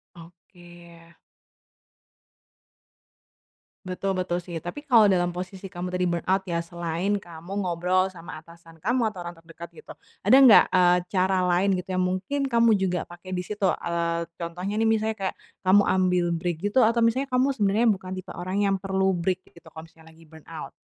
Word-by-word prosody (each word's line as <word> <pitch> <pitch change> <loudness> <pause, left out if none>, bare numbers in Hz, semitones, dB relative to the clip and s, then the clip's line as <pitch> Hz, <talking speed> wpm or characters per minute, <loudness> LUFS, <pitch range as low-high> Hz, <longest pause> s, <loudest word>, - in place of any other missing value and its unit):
Oke. 175 0 -16 2.9
Betul 190 +1 -3
betul 180 -1 -2
sih, 175 -1 -9
tapi 175 +11 -6
kalau 220 -6 +6
dalam 175 -1 0
posisi 185 +2 -7
kamu 180 -1 -6
tadi 180 0 0
burnout 175 +3 0
ya, 170 -1 -2
selain 170 +4 -2
kamu 170 0 -12 0.2
ngobrol 180 +2 +1
sama 180 -2 -10
atasan 165 0 -17
kamu 225 +3 0
atau 185 - -11
orang 175 - -8
terdekat 165 +1 -12
gitu, 460 - -12 0.3
ada 265 - +6
nggak, 255 -6 +8
eee, 180 -1 +4
cara 185 -1 +1
lain 190 +2 +2
gitu 180 +1 -5
yang 185 - -1
mungkin 185 +10 -1
kamu 230 -4 +3
juga 180 -3 -1
pakai 180 +2 -9
di 180 - -3
situ, 205 0 -2
eee, 170 -1 -1 0.2
contohnya 180 +5 -4
nih 225 - +2
misalnya 220 0 +1
kayak - - -5 0.3
kamu 200 +2 +6
ambil 180 -1 +1
break 170 0 -2
gitu 205 +5 +2
atau 230 0 +3
misalnya 255 +4 +1
kamu 255 0 +1
sebenarnya 220 -1 +1
bukan 185 -2 -5
tipe 185 0 -8
orang 185 +3 -5
yang 195 -1 +2
perlu 190 0 0
break 185 +1 -2
gitu 170 - -18
kalau 160 0 -11
misalnya 160 0 -18
lagi 165 - -18
burnout? 160 0 -10
185 Hz, 170 wpm, -25 LUFS, 170-200 Hz, 2.9 s, nggak